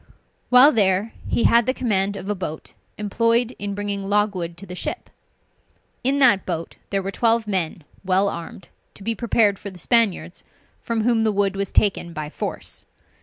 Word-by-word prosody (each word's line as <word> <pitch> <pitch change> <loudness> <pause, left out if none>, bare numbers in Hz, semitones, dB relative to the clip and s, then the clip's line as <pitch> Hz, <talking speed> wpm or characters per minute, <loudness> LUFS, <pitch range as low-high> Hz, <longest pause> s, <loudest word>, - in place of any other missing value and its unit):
While 255 +4 +8
there, 200 -1 +2
he - - 0
had 235 -1 +4
the 255 - +1
command 200 -5 0
of 195 -1 -7
a 210 - 0
boat 170 -5 -6 0.2
employed 230 +4 +1
in 200 0 -4
bringing 205 -1 -3
logwood 200 -5 0
to 195 - -10
the 180 - -8
ship. 180 - -5 0.9
In 270 +3 +1
that 240 -9 +5
boat 165 -2 -5
there 195 -1 -1
were 195 - -3
twelve 230 +1 +1
men 180 -5 -2 0.2
well 190 +1 +2
armed, 170 0 -7 0.3
to 200 - -10
be 230 +3 0
prepared 220 -3 +1
for 200 - -7
the 185 - -13
Spaniards, 225 +2 +1 0.4
from 230 -1 -2
whom 235 -1 +2
the 220 -1 +2
wood 200 -1 0
was 195 0 -3
taken 190 -4 +1
by 155 -1 -6
force. - - -5
200 Hz, 175 wpm, -22 LUFS, 190-230 Hz, 0.9 s, While